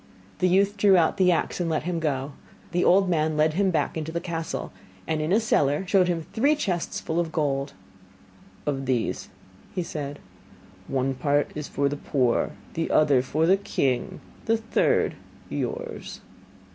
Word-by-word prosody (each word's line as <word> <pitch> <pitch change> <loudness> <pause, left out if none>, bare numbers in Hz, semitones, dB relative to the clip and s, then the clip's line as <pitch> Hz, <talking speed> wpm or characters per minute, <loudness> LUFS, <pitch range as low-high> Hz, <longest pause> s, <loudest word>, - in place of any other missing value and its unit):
The 185 - +3
youth 200 +3 +3
drew 195 -1 +5
out 170 +3 +2
the 185 -2 +4
axe 170 - 0
and 175 -2 0
let 155 - 0
him 175 0 -2
go. 140 -3 -1 0.4
The 175 +1 +1
old 195 +2 +5
man 155 -3 +1
led 155 +1 +3
him 195 +3 +2
back 155 -5 0
into 160 0 -4
the 170 - -2
castle, 165 -2 -4 0.3
and 155 -1 -1
in 155 +3 -1
a 210 - +5
cellar 150 -7 +1
showed 185 -1 +3
him 165 -3 -1
three 280 +7 +3
chests 180 - -2
full 160 +1 -2
of 165 -2 -1
gold. 140 -3 -1 0.9
'Of 135 -2 -2
these,' 125 -3 -1 0.5
said 145 -3 -5 0.7
he, - - -11
'one 135 0 +1
part 145 +2 +1
is 150 -1 -5
for 140 0 0
the 145 +1 -2
poor, 130 -5 +1 0.2
the 165 - -2
other 145 -4 +4
for 155 +5 0
the 190 +3 +5
king, 135 -10 -1 0.2
the 225 0 +3
third 225 - +1 0.4
yours. 480 -1 -4
160 Hz, 170 wpm, -25 LUFS, 145-185 Hz, 0.9 s, drew